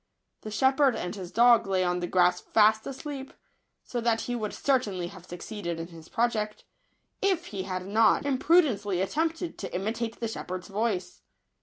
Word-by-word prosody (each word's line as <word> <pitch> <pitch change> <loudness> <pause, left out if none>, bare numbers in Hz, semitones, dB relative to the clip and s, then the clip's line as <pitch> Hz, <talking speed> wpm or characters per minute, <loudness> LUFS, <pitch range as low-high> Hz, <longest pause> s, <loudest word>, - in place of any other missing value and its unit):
The 215 - -7
shepherd 265 +4 +3
and 175 - -4
his 185 -4 -7
dog 235 -2 +5
lay 190 -1 +1
on 180 0 0
the 175 - -2
grass 180 0 +3
fast 220 0 +3
asleep; 275 0 -6 0.5
so 240 - -4
that 230 -1 +1
he 245 - -3
would 215 -3 -3
certainly 205 -10 0
have 185 -1 -13
succeeded 175 -1 -5
in 165 +1 -6
his 165 -2 -13
project, 220 -3 -1 0.6
if 375 -3 +1
he 190 -2 -3
had 185 0 -3
not 220 +6 +3
imprudently 260 - +2
attempted 325 - -1
to 195 - -5
imitate 225 +4 -3
the 230 - -1
shep 225 - -7
herd's 185 +1 -5
voice. 195 -4 -2
215 Hz, 170 wpm, -28 LUFS, 185-245 Hz, 0.6 s, dog